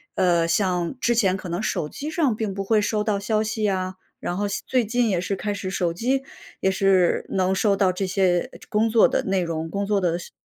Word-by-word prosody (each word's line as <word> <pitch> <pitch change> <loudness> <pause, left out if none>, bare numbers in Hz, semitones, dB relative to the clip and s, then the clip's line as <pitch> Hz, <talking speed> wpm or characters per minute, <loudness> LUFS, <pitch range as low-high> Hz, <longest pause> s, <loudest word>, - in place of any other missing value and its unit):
呃， 170 -2 +3
像 180 +4 0
之 240 - +2
前 195 -5 +2
可 190 - -8
能 175 +3 -2
手 150 - -1
机 290 - -6
上 300 -9 +1
并 215 -3 -3
不 195 - -2
会 215 +1 +3
收 210 0 0
到 210 -2 0
消 215 +1 0
息 220 0 -3
呀， 185 -2 -1 0.2
然 175 - -3
后 205 +1 -1
现 200 - -4
最 255 -2 +2
近 235 +1 +1
也 180 -3 0
是 195 +1 -2
开 205 +1 -3
始 200 -1 -4
手 175 -3 -1
机 255 +9 0 0.4
也 190 - +2
是 190 -2 +3
能 190 0 +1
收 200 +1 +2
到 195 -1 +3
这 195 +2 -2
些， 185 -2 +1
呃， - - -12
工 220 +2 +2
作 225 0 +5
的 - - 0
内 190 -1 +1
容、 165 -1 -3
工 200 +3 -2
作 205 -1 +1
的 170 -2 +1
事 175 - -10
195 Hz, 260 characters per minute, -23 LUFS, 185-215 Hz, 0.4 s, 作